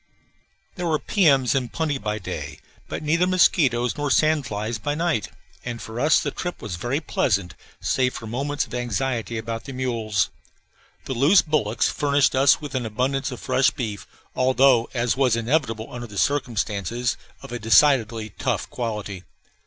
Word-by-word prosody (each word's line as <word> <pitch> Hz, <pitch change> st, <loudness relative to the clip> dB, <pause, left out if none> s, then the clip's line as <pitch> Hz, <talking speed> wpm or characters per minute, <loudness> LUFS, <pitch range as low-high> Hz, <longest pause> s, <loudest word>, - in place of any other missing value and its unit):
There 180 Hz, -1 st, -2 dB
were 155 Hz, -2 st, +2 dB
piums 140 Hz, -, +3 dB
in 125 Hz, -3 st, -1 dB
plenty 155 Hz, -4 st, -2 dB
by 105 Hz, -1 st, -2 dB
day, 95 Hz, -, -6 dB, 0.3 s
but -, -, -5 dB
neither 165 Hz, +4 st, +2 dB
mosquitoes 130 Hz, -10 st, +3 dB
nor 145 Hz, -1 st, -1 dB
sand 155 Hz, 0 st, +2 dB
flies 110 Hz, +2 st, -3 dB
by 145 Hz, +7 st, -2 dB
night; 165 Hz, -8 st, 0 dB, 0.3 s
and 120 Hz, -1 st, -5 dB
for 115 Hz, +1 st, -7 dB
us 150 Hz, +2 st, +4 dB
the -, -, -2 dB
trip 175 Hz, -1 st, -5 dB
was 100 Hz, -5 st, -5 dB
very 120 Hz, -, -1 dB
pleasant, 100 Hz, -, 0 dB, 0.3 s
save 130 Hz, -1 st, 0 dB
for 115 Hz, -, -7 dB
moments 140 Hz, +6 st, -2 dB
of -, -, -14 dB
anxiety 120 Hz, -1 st, -2 dB
about 115 Hz, 0 st, -5 dB
the 135 Hz, -, -7 dB
mules. 115 Hz, -6 st, -1 dB, 0.7 s
The -, -, -3 dB
loose 145 Hz, +10 st, +5 dB
bullocks 135 Hz, -8 st, +1 dB
furnished 140 Hz, -1 st, +2 dB
us 135 Hz, 0 st, +5 dB
abundance 130 Hz, 0 st, -2 dB
of 125 Hz, -, -7 dB
fresh 130 Hz, -1 st, +3 dB
beef, 110 Hz, -5 st, -5 dB, 0.3 s
although, 130 Hz, -2 st, +4 dB
as 120 Hz, -2 st, +1 dB
was 130 Hz, -4 st, +3 dB
inevitable 115 Hz, -2 st, -1 dB
under 120 Hz, -1 st, -6 dB
the 105 Hz, -2 st, -10 dB
circumstances, 120 Hz, -3 st, 0 dB, 0.3 s
of -, -, -10 dB
a 120 Hz, -, -4 dB
decidedly 115 Hz, -2 st, +3 dB
tough -, -, -1 dB
quality. 105 Hz, -5 st, -4 dB
125 Hz, 160 wpm, -23 LUFS, 110-140 Hz, 0.7 s, loose